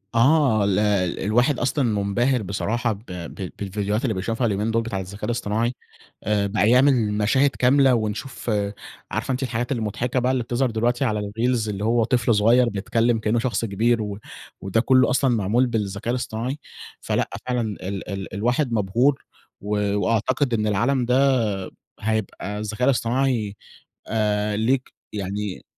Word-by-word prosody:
آه 130 Hz, -3 st, +4 dB
ال 100 Hz, -1 st, +2 dB, 0.4 s
الواحد 120 Hz, +7 st, +2 dB
أصلًا 135 Hz, +3 st, 0 dB
منبهر 115 Hz, +3 st, +1 dB
بصراحة 115 Hz, +5 st, -1 dB
ب 105 Hz, +3 st, -13 dB
ب 90 Hz, +1 st, -6 dB
بالڤيديوهات 105 Hz, +2 st, -1 dB
اللي 125 Hz, -5 st, +1 dB
بيشوفها 115 Hz, +5 st, -1 dB
اليومين 105 Hz, +2 st, -1 dB
دول 115 Hz, +1 st, +2 dB
بتاع 100 Hz, -4 st, -3 dB
الذكاء 95 Hz, +2 st, -6 dB
الإصطناعي. 120 Hz, 0 st, -1 dB, 0.5 s
آآ 105 Hz, -1 st, +1 dB
بقى 105 Hz, +1 st, +2 dB
يعمل 125 Hz, -4 st, +4 dB
مشاهد 110 Hz, +7 st, +3 dB
كاملة 135 Hz, +1 st, +4 dB
ونشوف 110 Hz, +3 st, -3 dB, 0.6 s
عارفة 110 Hz, +6 st, -2 dB
أنتِ 130 Hz, +1 st, -2 dB
الحاجات 120 Hz, 0 st, -2 dB
المضحكة 120 Hz, +1 st, -1 dB
بقى 125 Hz, +1 st, +1 dB
اللي 130 Hz, -2 st, 0 dB
بتظهر 125 Hz, +2 st, 0 dB
دلوقتي 120 Hz, +4 st, 0 dB
على 110 Hz, -4 st, 0 dB
الreels 115 Hz, +3 st, -1 dB
اللي 100 Hz, -1 st, -4 dB
هو 115 Hz, +1 st, +2 dB
طفل 120 Hz, -1 st, +2 dB
صغير 120 Hz, +4 st, +4 dB
بيتكلم 115 Hz, +3 st, 0 dB
كأنه 110 Hz, +2 st, +1 dB
شخص 120 Hz, -1 st, -1 dB
كبير 115 Hz, +3 st, +1 dB
و 105 Hz, -2 st, -4 dB, 0.4 s
وده 95 Hz, +4 st, +1 dB
كله 130 Hz, +1 st, +4 dB
أصلًا 130 Hz, -2 st, +2 dB
معمول 110 Hz, +5 st, +2 dB
بالذكاء 105 Hz, -1 st, -2 dB
الإصطناعي؟ 125 Hz, +3 st, -3 dB, 0.4 s
فلأ، -, -, -1 dB, 0.2 s
فعلًا 125 Hz, -1 st, 0 dB
ال 100 Hz, -3 st, -5 dB
ال 100 Hz, -1 st, -5 dB
الواحد 120 Hz, +6 st, 0 dB
مبهور 115 Hz, +7 st, +1 dB, 0.4 s
و 105 Hz, 0 st, -1 dB
وأعتقد 120 Hz, +5 st, +1 dB
إن 110 Hz, -1 st, +1 dB
العالم 120 Hz, +5 st, +1 dB
ده 125 Hz, +1 st, +2 dB, 0.8 s
هيبقى 105 Hz, -1 st, -3 dB
الذكاء 110 Hz, +4 st, -2 dB
الإصطناعي 120 Hz, -4 st, +1 dB, 0.5 s
آآ 105 Hz, -1 st, 0 dB
ليك 125 Hz, +4 st, 0 dB, 0.2 s
يعني 100 Hz, -1 st, -4 dB
115 Hz, 150 wpm, -23 LUFS, 105-125 Hz, 0.8 s, آه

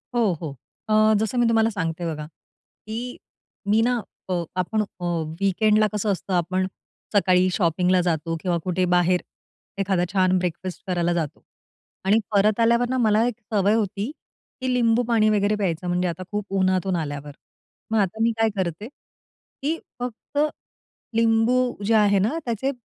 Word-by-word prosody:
हो, 220 Hz, -6 st, +3 dB
हो. 145 Hz, -4 st, -5 dB, 0.3 s
अ, 215 Hz, 0 st, +5 dB
जसं 220 Hz, +3 st, -1 dB
मी 240 Hz, -, +4 dB
तुम्हाला 225 Hz, 0 st, +3 dB
सांगते 170 Hz, -4 st, -3 dB
बघा, 150 Hz, 0 st, -6 dB
की 220 Hz, +9 st, -10 dB, 0.5 s
मी 215 Hz, +2 st, +4 dB
ना 245 Hz, 0 st, +2 dB, 0.3 s
अ, 175 Hz, -2 st, 0 dB
आपण 200 Hz, +4 st, 0 dB
अ, 180 Hz, -3 st, -6 dB, 0.3 s
वीकेंडला 215 Hz, +2 st, +3 dB
कसं 210 Hz, 0 st, 0 dB
असतं, 190 Hz, 0 st, -3 dB
आपण 185 Hz, +2 st, +1 dB, 0.5 s
सकाळी 185 Hz, -1 st, +4 dB
शॉपिंगला 180 Hz, 0 st, +2 dB
जातो. 165 Hz, -1 st, -1 dB
किंवा 175 Hz, -2 st, 0 dB
कुठे 185 Hz, 0 st, 0 dB
बाहेर 180 Hz, 0 st, +3 dB, 0.6 s
एखादा 190 Hz, -2 st, +1 dB
छान 185 Hz, -1 st, +3 dB
ब्रेकफास्ट 180 Hz, 0 st, -4 dB
करायला 175 Hz, -1 st, +1 dB
जातो. 160 Hz, -3 st, -3 dB, 0.6 s
आणि 210 Hz, +3 st, +4 dB
परत 210 Hz, +2 st, +3 dB
आल्यावर 235 Hz, +1 st, +3 dB
ना 260 Hz, -, 0 dB
मला 220 Hz, -1 st, +3 dB
एक 240 Hz, -1 st, -4 dB
सवय 205 Hz, +1 st, +3 dB
होती, 210 Hz, +3 st, -1 dB, 0.5 s
की 255 Hz, -1 st, 0 dB
लिंबूपाणी 230 Hz, -2 st, +3 dB
वगैरे 210 Hz, 0 st, +2 dB
प्यायचं. 180 Hz, -3 st, -2 dB
म्हणजे 180 Hz, +1 st, +1 dB
आता 175 Hz, +2 st, -4 dB
खूप 205 Hz, -1 st, -2 dB
उन्हातून 185 Hz, 0 st, +1 dB
आल्यावर. 145 Hz, -2 st, -4 dB, 0.6 s
मग 225 Hz, -, +2 dB
आता 205 Hz, +3 st, -1 dB
मी 230 Hz, -, +3 dB
काय 225 Hz, 0 st, +4 dB
करते? 185 Hz, +4 st, -2 dB, 0.7 s
की 315 Hz, +4 st, 0 dB, 0.2 s
फक्त 245 Hz, +3 st, -6 dB, 0.8 s
लिंबू 230 Hz, +2 st, +3 dB, 0.3 s
जे 225 Hz, -, +2 dB
आहे 205 Hz, -2 st, +4 dB
ना 230 Hz, +12 st, 0 dB
त्याचे 240 Hz, +4 st, -1 dB
200 Hz, 150 wpm, -24 LUFS, 180-225 Hz, 0.8 s, अ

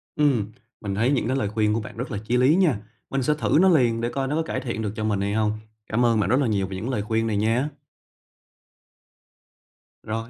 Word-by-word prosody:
Ừm, 130 Hz, -9 st, +1 dB, 0.3 s
mình 100 Hz, -2 st, -3 dB
thấy 115 Hz, +6 st, +2 dB
những 135 Hz, -5 st, +1 dB
cái 130 Hz, -, 0 dB
lời 105 Hz, -6 st, -1 dB
khuyên 105 Hz, 0 st, +1 dB
của 115 Hz, -, 0 dB
bạn 110 Hz, -, -9 dB
rất 125 Hz, +3 st, -5 dB
là 105 Hz, -, -2 dB
chí 120 Hz, +3 st, +1 dB
lý 130 Hz, +5 st, +4 dB
nha, 175 Hz, -, +3 dB, 0.3 s
mình 135 Hz, -1 st, -1 dB
sẽ 150 Hz, -, +2 dB
thử -, -, +2 dB
nó 190 Hz, -, +6 dB
liền, 120 Hz, -9 st, +3 dB
để 120 Hz, -, -1 dB
coi 135 Hz, +1 st, -2 dB
nó 145 Hz, -, -1 dB
có 160 Hz, -, +1 dB
cải -, -, -3 dB
thiện 120 Hz, -3 st, -4 dB
được 105 Hz, -2 st, -2 dB
cho 110 Hz, -, -3 dB
mình 105 Hz, -2 st, 0 dB
hay 100 Hz, +1 st, -1 dB
hông. 110 Hz, -1 st, +1 dB, 0.4 s
Cám 120 Hz, +3 st, +1 dB
ơn 115 Hz, -2 st, +3 dB
bạn 100 Hz, -, +1 dB
rất 130 Hz, +4 st, +3 dB
là 140 Hz, -, +1 dB
nhiều 100 Hz, -3 st, 0 dB
về 95 Hz, -, -6 dB
những 105 Hz, +7 st, -4 dB
lời 125 Hz, -6 st, -1 dB
khuyên 110 Hz, +2 st, -1 dB
này 105 Hz, -2 st, 0 dB
nhé. 115 Hz, +6 st, +1 dB, 2.4 s
Rồi, 115 Hz, +1 st, -4 dB
115 Hz, 250 wpm, -24 LUFS, 105-130 Hz, 2.4 s, nó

